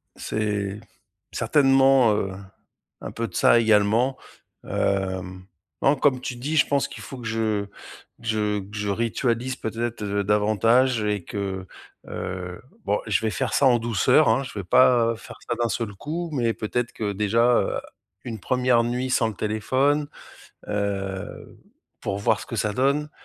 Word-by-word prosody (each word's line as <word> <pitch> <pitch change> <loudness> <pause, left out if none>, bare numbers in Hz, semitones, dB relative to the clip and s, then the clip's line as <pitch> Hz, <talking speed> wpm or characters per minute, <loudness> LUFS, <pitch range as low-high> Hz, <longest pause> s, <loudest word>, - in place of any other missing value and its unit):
C'est 105 -2 -2 0.5
certainement, 135 -4 +4
heu, 95 -2 -1 0.7
un - - -6
peu 115 0 -3
de - - -16
ça, 120 - +5
également. 110 +4 +3 0.5
Hem, 95 -1 -2 0.4
non, 140 +2 +4
comme 130 -3 +2
tu 125 - -4
dis, 145 +6 -2
je - - +4
pense 140 -1 +1
qu'il - - -10
faut 135 - -8
que 115 - -6
je 110 -2 -1 0.6
que 115 - -9
je 105 -2 0
que 100 +2 -9
je 105 0 -2
ritualise 115 +4 -1
peut-être, 115 -1 -4
heu, 100 0 -1
davantage 110 +4 +3
et 105 -3 -1
que, 95 -1 -4 0.4
heu, 90 -1 -6 0.2
bon, 105 +1 +1
je 105 +1 +1
vais 110 - 0
faire 130 0 -2
ça 145 - +3
en 120 -2 +4
douceur, 115 - +3
hein, 135 - +2
je 130 -5 -9
vais - - -4
pas 115 +2 +4
faire - - -12
ça 120 - +1
d'un 115 - +1
seul 105 0 -3
coup 165 - -4
mais 120 -4 +1
peut-être 120 +3 -2
que 105 -2 -3
déjà, 105 +3 +1 0.2
heu, - - -1 0.5
une 115 -3 -5
1re 125 +1 +2
nuit 125 +2 -2
sans 120 -2 +2
le 110 - -6
téléphone, 130 +8 0 0.6
heu, 100 -1 -4 0.4
pour 100 - -2
voir 105 0 +2
ce - - -8
que - - -6
ça 105 -1 0
donne 140 +4 +1
115 Hz, 165 wpm, -24 LUFS, 100-125 Hz, 0.7 s, ça